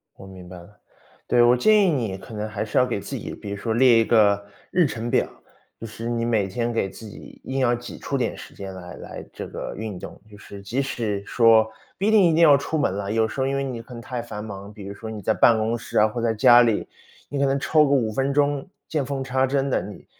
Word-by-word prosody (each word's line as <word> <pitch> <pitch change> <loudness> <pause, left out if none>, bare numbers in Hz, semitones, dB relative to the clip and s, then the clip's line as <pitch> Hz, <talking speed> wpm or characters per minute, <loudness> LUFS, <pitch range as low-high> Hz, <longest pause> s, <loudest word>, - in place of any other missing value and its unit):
我 - - -13
明 95 -2 -12
白 90 0 -10
了。 90 +4 -16 0.5
对， 120 - +4
我 120 +1 +5
建 215 - +4
议 200 -3 +4
你 115 - -1
可 110 - -12
能 105 0 -4
还 105 -1 -4
是 110 - -3
要 125 - +5
给 120 -5 -3
自 120 +8 -7
己， - - -7
比 105 - -9
如 100 - -4
说 110 +2 -2
列 120 -1 +5
一 115 - +2
个 100 -3 +3 0.3
日 175 -2 +3
程 120 -3 -4
表， - - +2 0.5
就 - - -7
是 115 +1 -7
你 115 -1 -1
每 110 -4 +1
天 120 +5 -2
给 100 -4 -1
自 110 - -12
己 105 - -12
硬 135 +1 -3
要 120 -2 +2
挤 120 +1 -9
出 - - -3
点 - - -1
时 - - -11
间 95 -1 -8
来 90 -1 -9
来 - - -9
这 - - -7
个 - - -6
运 105 -4 -6
动。 - - -10
就 105 - -14
是 100 -1 -11
即 120 +8 -2
使 110 -7 -3
说 115 -2 +4 0.3
不 195 - 0
一 215 - +3
定 215 -3 +6
一 170 -3 +4
定 - - +1
要 155 -4 +7
出 150 +3 -2
门 140 -11 +1
了， 100 0 -4
有 110 0 +2
时 130 - -4
候 130 - +1
因 135 0 -1
为 140 - -1
你 125 -4 -5
可 125 +2 -13
能 115 - -8
太 120 0 -5
繁 105 -2 -7
忙， 100 -1 -8
比 100 -2 -10
如 100 - -6
说 110 +2 -8
你 105 -2 -7
在 110 - +1
办 115 +1 +5
公 110 +2 0
室 - - -5
啊， 105 - +6
或 115 +2 -4
在 115 -1 +1
家 120 +2 +7
里， 115 -3 +1 0.4
你 145 - -4
可 140 - +3
能 135 0 +1
抽 155 +2 +3
个 140 - -1
5 120 -6 +2
分 135 +3 0
钟， 145 +1 +1 0.2
见 150 -4 -1
缝 135 -1 -3
插 130 0 +1
针 135 +1 0
地， - - +1
你 105 - -10
115 Hz, 290 characters per minute, -23 LUFS, 105-135 Hz, 0.5 s, 要